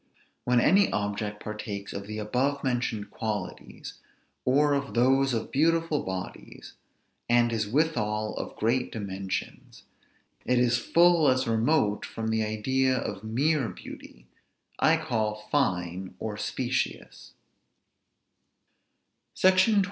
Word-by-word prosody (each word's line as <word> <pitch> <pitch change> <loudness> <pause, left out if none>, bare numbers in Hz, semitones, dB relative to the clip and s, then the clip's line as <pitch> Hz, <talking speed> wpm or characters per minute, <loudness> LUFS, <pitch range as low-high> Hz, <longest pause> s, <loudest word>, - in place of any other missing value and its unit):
When 125 0 +3
any 195 +10 +4
object 105 0 -3
partakes 105 -2 -6
of 100 0 -6
the 110 0 -5
above 130 +7 -1
mentioned 120 -5 -2
qualities, 105 -4 -6 0.5
or 145 +3 +3
of 140 -2 -2
those 135 +3 +3
of 115 -2 -3
beautiful 165 +1 +2
bodies, 95 0 -7 0.6
and 120 0 +3
is 110 -2 -1
withal 110 -7 0
of - - -6
great 120 +3 0
dimensions, 95 -3 -5 0.6
it 125 +1 +1
is 120 -1 +3
full 170 +3 +4
as 130 -1 +2
remote 115 -1 +1
from 110 0 -4
the 110 0 +1
idea 130 +5 +1
of 100 -4 -4
mere 130 +4 +1
beauty; - - -11 0.5
I - - +4
call 110 -2 -2
fine 90 -8 -1
or 110 -1 -4
specious. 125 +4 -3 2.0
SECTION 190 +4 +4
XXIV. - - +5
120 Hz, 115 wpm, -27 LUFS, 105-135 Hz, 2.0 s, XXIV